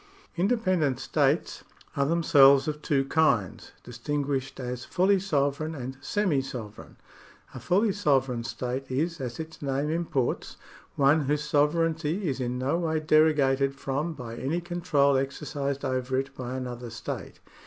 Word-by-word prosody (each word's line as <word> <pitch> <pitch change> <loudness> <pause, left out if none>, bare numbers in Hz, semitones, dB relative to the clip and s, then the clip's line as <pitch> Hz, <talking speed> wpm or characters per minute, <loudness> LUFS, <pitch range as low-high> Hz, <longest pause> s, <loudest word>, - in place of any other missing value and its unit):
^ - - -27 0.3
Independent 180 - +1
states 145 +3 0 0.3
are 140 -1 +1
themselves 140 -4 +5
of 150 0 -3
two 135 -3 +1
kinds, 130 - +1
distin 140 +5 -3
guished 135 -1 -3
as 125 -1 -4
fully 190 +2 +2
sovereign 155 -3 -1
and 130 -1 -6
semi 185 -6 +1
sovereign. 115 -5 -8 0.6
A 130 - -7
fully 195 - +2
sovereign 135 - +1
state 130 +3 -4
is, 155 +5 -1
as 125 +1 -5
its 160 0 -8
name 140 +1 -1
imports, 160 -6 -2 0.4
one 145 +2 +3
whose 150 +2 0
sovereignty 160 +4 +1
is 135 -3 -2
in 125 0 -2
no 135 +6 0
way 160 -2 0
derogated 145 -3 +3
from 140 +4 -2
by 115 -4 -7
any 145 +8 -2
control 170 -6 +1
exercised 140 0 -3
over 130 0 -1
it 135 +1 -3
by 125 0 -5
another 125 -2 -6
state. 115 - -7
140 Hz, 145 wpm, -27 LUFS, 130-160 Hz, 0.6 s, themselves